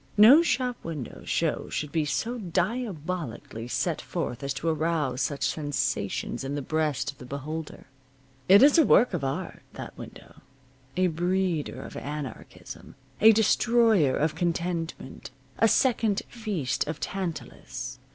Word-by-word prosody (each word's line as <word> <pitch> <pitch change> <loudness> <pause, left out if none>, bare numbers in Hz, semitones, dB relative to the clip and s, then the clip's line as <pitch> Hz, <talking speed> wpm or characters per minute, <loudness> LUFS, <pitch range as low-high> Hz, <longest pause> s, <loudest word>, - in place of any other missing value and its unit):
No 240 +10 +9
shop 255 -7 0
window 150 -8 -6
show - - -1
should 150 -2 -3
be 160 -2 0
so 185 - -2
diabolically 180 - -3
set - - -1
forth 125 - -4
as 140 0 -3
to 165 - -4
arouse 155 -5 0
such 145 -2 -1
sensations 145 -3 -2
in 135 +1 -3
the 145 - -2
breast 150 -1 -1
of 140 - -24
the - - -9
beholder. 150 +4 -6 0.6
It 200 +6 +8
is 295 +4 +7
a - - +7
work 250 -5 +4
of 170 -6 -2
art, 155 +7 -4
that - - -8
window; - - -12 0.6
a 185 - +3
breeder 175 -1 -1
of - - -10
anarchism, 145 -1 -8 0.3
a 220 +1 +9
destroyer 220 - +3
of 155 +1 +1
contentment, 170 -3 -3 0.3
a 225 - +5
second 225 -3 +2
feast 205 - -2
of 155 -1 -4
Tantalus. 130 -6 -5
165 Hz, 140 wpm, -27 LUFS, 145-205 Hz, 0.6 s, No